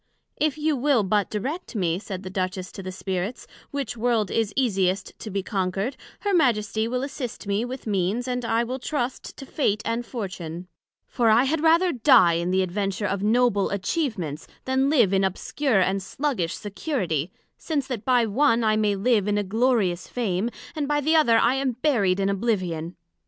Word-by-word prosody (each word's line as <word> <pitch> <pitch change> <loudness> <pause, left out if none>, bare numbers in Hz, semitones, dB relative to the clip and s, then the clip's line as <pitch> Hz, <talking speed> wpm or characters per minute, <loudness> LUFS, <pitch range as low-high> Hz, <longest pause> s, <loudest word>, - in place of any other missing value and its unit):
If 305 -1 +1
you 305 0 +1
will 270 -3 +2
but 205 +1 +1
direct 270 - -4
me, 175 -4 0
said 195 -2 -7
the 185 - -7
Duchess 185 0 -3
to - - -8
the 185 0 -6
Spirits, 190 +4 -4 0.2
which 280 -4 -4
World 230 -3 0
is 225 -2 0
easiest 195 -7 0
to 220 - -7
be 195 -1 -2
conquered, 195 +5 -2 0.3
her 405 -1 0
Majesty 220 - +2
will 250 +2 -2
assist 265 -5 -5
me 200 +2 0
with 255 +1 -6
Means, 205 +4 0
and 250 -1 -2
I 230 0 +1
will 255 +3 -4
trust 255 -2 -3
to 270 - -8
Fate 215 -7 0
and 230 +1 -1
Fortune; 185 -7 -6 0.4
for 235 -3 +1
I 225 +3 +5
had 295 +3 0
rather 335 +3 +4
die 235 - +5
in 170 +1 -1
the 190 +1 +2
adventure 195 +2 -2
of 200 -1 -1
noble 220 -1 +2
atchievements, 200 - -2 0.2
then 265 +1 +2
live 240 -10 +4
in 195 0 +3
obscure 195 +4 0
and 195 +1 +1
sluggish 190 - -2
security; 195 - -2 0.3
since 295 -5 -2
the 250 -4 -3
by 245 +1 +2
one, 230 +1 +2
I 215 -1 +3
may 210 -2 +2
live 210 0 +2
in 205 0 +1
a 205 - +1
glorious 210 -4 +1
Fame; 220 -3 -1 0.3
and 295 -2 -2
by 295 0 +1
the 310 +3 +2
other 240 -8 +5
I 235 +2 +4
am 270 -1 0
buried 225 -8 +1
in 195 - +1
oblivion. 185 -5 -1
220 Hz, 185 wpm, -25 LUFS, 190-260 Hz, 0.4 s, I